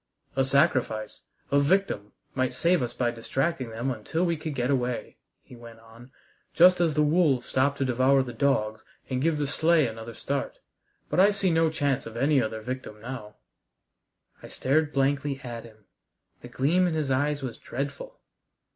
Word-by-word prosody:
"A 135 - +3
sacrifice, 130 -6 +1 0.3
a 140 - +4
victim, 140 - 0 0.2
might 130 -1 -1
save 170 +4 +2
us 120 - -2
by 120 -2 -1
distracting 130 +3 -2
them 120 +4 -3
until 130 - -2
we 170 -1 +1
could 155 -1 -5
get 125 +1 0
away," 125 -2 -2 0.3
he - - -14
went 115 -1 -13
on, 115 +2 -16 0.5
"just 180 +1 +6
as 165 -4 +2
the 150 - +3
wolves 150 -4 +2
stop 135 +2 +1
to 135 - -1
devour 130 +2 +3
the 120 -2 -7
dogs 110 -4 0 0.3
and 130 0 0
give 160 +1 +1
the 145 - 0
sleigh 160 +2 +3
another 115 0 -6
start. 140 0 -3 0.5
But - - +1
I 195 +2 +7
see 195 -3 0
no 165 0 +3
chance 145 -6 -1
of 115 0 -8
any 140 +2 +3
other 110 -1 -3
victim 125 -2 -6
now." 115 -2 -8 1.1
I - - -10
stared 150 +3 0
blankly 140 0 0
at 120 -2 -7
him. 110 -2 -17 0.6
The - - -9
gleam 175 +7 +2
in 165 - -1
his 150 -4 -1
eyes 145 +2 0
was 125 -3 -5
dreadful. 140 - -6
135 Hz, 175 wpm, -27 LUFS, 120-155 Hz, 1.1 s, I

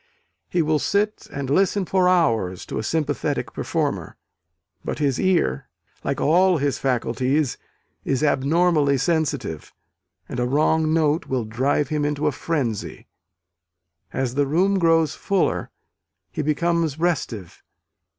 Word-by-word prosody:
He 175 -2 +1
will 155 0 +1
sit 210 +5 -1
and 140 -1 -4
listen 190 +6 +2
for 185 0 +2
hours 115 - +1
to - - -4
a - - -3
sympathetic 145 +1 -2
performer: - - -2 0.7
but - - -3
his 140 -4 0
ear, 170 - +1 0.3
like - - -2
all 180 +3 +4
his 140 -2 -1
faculties, 130 +2 0 0.4
is 135 +2 -1
abnormally 150 0 +2
sensitive: 145 - -1 0.6
and 125 - -5
a 125 - +1
wrong 155 +3 +2
note 160 +1 +1
will 130 -3 -1
drive 130 +6 0
him 150 -1 -1
into 145 +1 -1
a 150 - +3
frenzy. 135 - -3 1.1
As 130 -2 -2
the 140 +1 +1
room 190 +7 +2
grows 165 -3 +3
fuller, 195 -2 0 0.6
he - - -3
becomes 160 0 0
restive. 135 - -2
150 Hz, 130 wpm, -23 LUFS, 130-170 Hz, 1.1 s, all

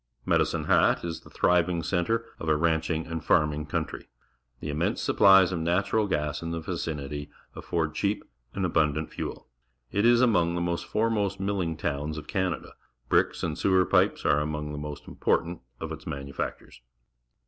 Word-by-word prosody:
Medicine - - +1
Hat - - +3
is 85 -1 -4
the - - -16
thriving 90 -1 +2
centre 100 +7 0
of 80 - -3
a 75 - +4
ranclung 80 0 0
and 80 0 -5
farming 75 -1 +2
country. - - -3 0.5
The 75 - -4
im 75 - -3
mense - - 0
supplies 95 -1 +6
of 90 - -2
natural 95 +6 +1
gas 75 -5 -1
in 85 - -4
the 85 0 -3
vicinity 75 -4 -4 0.3
afford 80 -3 -2
cheap 100 +5 -1 0.3
and 95 - 0
abundant 80 -2 +1
fuel. - - -6 0.4
It 100 - +1
is 120 0 +6
among 90 -9 +3
the 85 0 0
foremost 105 +3 -1
milling 95 -5 -1
towns 75 0 -2
of 75 - -7
Can 95 -1 0
ada. - - -7 0.4
Bricks - - +2
and - - -1
sewer 95 -1 +3
pipes - - +2
are 75 - +4
among 75 0 -3
the 75 - -5
most 75 0 -7
important 85 0 0 0.2
of 80 - -5
its 80 -1 -8
manufactures. 70 -4 -5
85 Hz, 170 wpm, -27 LUFS, 75-95 Hz, 0.5 s, supplies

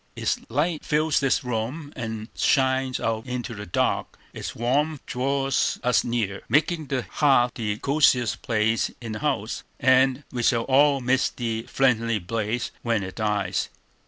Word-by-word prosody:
Its - - -1
light 150 +6 0
fills 155 0 +2
the 135 -1 +2
room 125 +6 -4
and 110 -2 -5
shines 130 -2 +2
out 115 -1 -1
into 125 -1 -4
the 105 -1 -8
dark; 85 - -1 0.2
its - - -6
warmth 140 +6 0
draws 135 +1 0
us 125 0 +3
nearer, 110 -5 -2
making 155 +4 +1
the 130 -2 -1
hearth 135 -5 +3
the 105 -3 -2
cosiest 135 -4 +2
place 110 0 +1
in 115 -2 -6
the 105 - -4
house, - - -2 0.2
and 130 +1 +4
we 125 - -3
shall 115 -1 +2
all 140 +1 +4
miss 130 +1 +2
the 115 -1 -4
friendly 115 -4 +2
blaze 110 +4 -2
when 115 -4 0
it 95 0 -6
dies. 105 -4 -1
125 Hz, 155 wpm, -25 LUFS, 110-135 Hz, 0.2 s, and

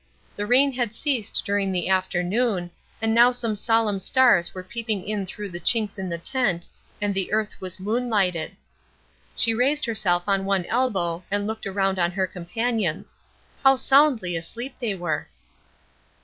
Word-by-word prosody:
The 205 0 -3
rain 270 +4 +4
had 240 -3 -2
ceased 255 -8 0
during 200 -2 0
the 180 -2 -1
afternoon, 185 +1 0 0.3
and 225 0 +2
now 240 +2 +7
some 240 -3 -1
solemn 215 -1 +1
stars 235 -4 +4
were 185 - -8
peeping 215 -1 -4
in 205 -2 -2
through 205 +2 -6
the 175 -1 -6
chinks 210 +2 +1
in 190 -1 -3
the 170 - -3
tent 195 -3 -1 0.3
and 205 0 0
the 190 -1 -2
earth 215 -1 -1
was 185 0 -5
moon 230 +6 -1
lighted. 185 -4 0 0.8
She 225 - +2
raised 275 +6 +1
herself 190 -6 +1
on 195 -1 +2
one 195 -2 0
elbow 190 -9 0
and 205 +1 -1
looked 220 -1 -4
around 195 -1 0
on 175 0 +3
her 190 0 +1
companions. 185 +1 -3 0.5
How 270 0 +7
soundly 265 - +3
asleep 235 +11 -6
they 225 -6 -1
were! 175 -4 -3
205 Hz, 165 wpm, -24 LUFS, 185-235 Hz, 0.8 s, now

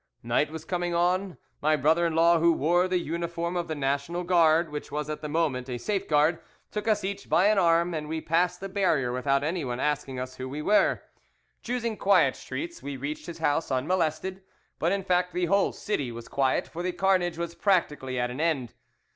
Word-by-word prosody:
"Night 120 +6 +1
was 160 0 -8
coming 175 -1 -2
on. 180 +2 +1 0.2
My 155 +1 +3
brother 160 +4 +3
in 165 - -3
law, 170 +1 +5
who 170 +1 +4
wore 175 +4 +2
the 185 0 +1
uniform 170 +1 -3
of 175 -1 -2
the 160 - -3
National 145 +5 -1
Guard, 165 -2 +3
which 150 0 -6
was 150 +1 -3
at 150 0 -5
that 150 - -5
moment 145 -5 -1
a 125 - -3
safeguard, 160 - +1 0.3
took 210 +1 -4
us 210 -2 +2
each 200 +1 -5
by 190 +4 +4
an 215 -2 +3
arm, 170 0 +3
and 150 -1 -4
we 160 0 -2
passed 180 +3 0
the 195 - -4
barrier 180 -10 +1
without 135 +2 +1
anyone 145 -6 -2
asking 145 -3 -1
us 130 0 -6
who 130 0 -5
we 145 +3 -5
were. 210 +4 +3 0.6
Choosing 235 -2 -2
quiet 180 -9 +4
streets, 340 +1 -6
we 140 -1 -5
reached 145 +6 -5
his 170 -1 -7
house 160 0 0
unmolested; 165 +6 -1 0.4
but 170 - +1
in 195 0 0
fact 180 -1 +1
the 180 0 +1
whole 200 +3 +2
city 145 - -3
was 115 0 -9
quiet, 135 -2 0
for 170 - -7
the 180 0 -2
carnage 185 -3 +1
was 170 0 -4
practically 150 -10 0
at 125 0 -1
an 130 +5 -4
end. 145 -8 0
165 Hz, 205 wpm, -27 LUFS, 145-180 Hz, 0.6 s, law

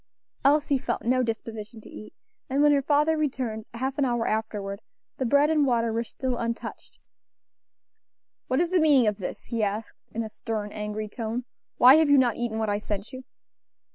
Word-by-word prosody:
Elsie 285 0 +3
felt - - -3
no 255 +2 +2
disposition 225 -1 -5
to - - -14
eat; 215 - -10 0.4
and 275 +2 +2
when 295 - +6
her 285 -1 +3
father 300 +3 +2
returned, 255 -8 -2
half 265 +4 -3
an - - +3
hour 240 -3 0
afterward, 210 -2 -3 0.4
the 260 - -1
bread 285 +4 +4
and 305 -2 +3
water 235 -4 +1
were 230 +1 0
still 255 +1 -4
untouched. 230 -1 -5 1.5
"What 255 - +1
is 345 +1 +1
the 370 - +3
meaning 290 -6 +5
of 210 -1 0
this?" 185 - -6
he 230 -2 -3
asked 210 +2 -3
in 230 - -3
a - - -5
stern, 215 -2 -4
angry 210 0 -4
tone; 230 +2 -4 0.3
"why 260 +4 +8
have 315 -2 +3
you 285 - +6
not 245 -4 +3
eaten 235 -2 -2
what 220 -1 -1
I 205 0 0
sent 210 +1 -5
you?" 260 0 -8
235 Hz, 190 wpm, -26 LUFS, 220-275 Hz, 1.5 s, why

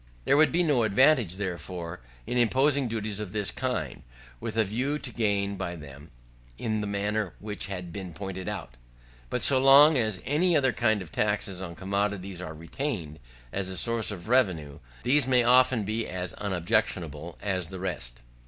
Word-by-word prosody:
There - - +4
would 150 -1 +5
be 175 +5 +2
no 145 -7 +2
advantage, 115 - +4
therefore, 90 -2 -5 0.3
in - - -3
imposing 135 +3 +3
duties 110 -2 -3
of 105 -3 -6
this 105 -2 0
kind, 105 - -3 0.4
with 110 - -5
a 110 - +5
view 125 +9 -1
to 135 - -5
gain 100 -3 0
by 90 -2 -4
them, 75 -1 -12 0.5
in 110 - -2
the 105 - -3
manner 100 -1 -2
which 105 -1 -5
has 95 -2 -5
been 90 +1 -7
pointed 95 +2 -6
out. - - -7 0.5
But - - 0
so 135 -2 +5
long 140 +2 +7
as 110 -5 0
any 165 +4 +3
other 135 -4 +2
kind 110 -2 +1
of 80 - -14
taxes 105 -3 -1
on 85 -2 -6
commodities 100 -1 -2
are 80 -3 -7
retained, 85 - -5 0.3
as 95 -1 -2
a 95 - -3
source 115 +4 +1
of 100 -3 -6
revenue, 85 - +1 0.2
these 135 0 +3
may 125 -2 +4
often 125 -1 +5
be 110 +3 -2
as 90 -1 -4
unobjectionable 85 -5 -2
as 95 -4 -2
the 95 - -8
rest. 65 -10 -5
100 Hz, 175 wpm, -27 LUFS, 90-120 Hz, 0.5 s, long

